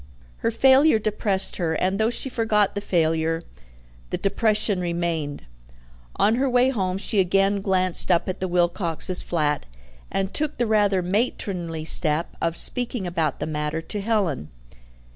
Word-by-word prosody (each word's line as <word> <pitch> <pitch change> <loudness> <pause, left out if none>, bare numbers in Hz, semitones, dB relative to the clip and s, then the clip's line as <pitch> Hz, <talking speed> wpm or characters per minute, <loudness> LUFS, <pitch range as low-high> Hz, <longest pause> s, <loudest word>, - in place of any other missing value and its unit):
Her - - -1
failure 265 +3 +4
depressed 210 -2 +1
her, 165 -3 -1
and 190 +5 -1
though 220 +1 +2
she 245 - -3
forgot 220 -5 +1
the 205 - -4
failure, 165 -3 0 0.7
the - - -2
depression 210 -1 0
remained. 170 - -3 0.7
On 220 +3 +2
her 270 +1 +1
way 250 +1 +3
home 190 -6 -2
she 200 +1 -1
again 195 +2 +2
glanced 185 -2 +2
up 175 -2 +2
at 185 0 -4
the 185 - -2
Wilcoxes' 175 0 +1
flat, 150 - -1 0.4
and 195 0 -2
took 300 0 -1
the 240 - +1
rather 205 -4 +2
matronly 180 -5 -2
step 160 0 +2
of 165 0 -1
speaking 245 -4 0
about 170 -3 -2
the - - -3
matter 150 0 -3
to 205 +5 -5
Helen. 195 - -1
190 Hz, 150 wpm, -23 LUFS, 170-215 Hz, 0.7 s, failure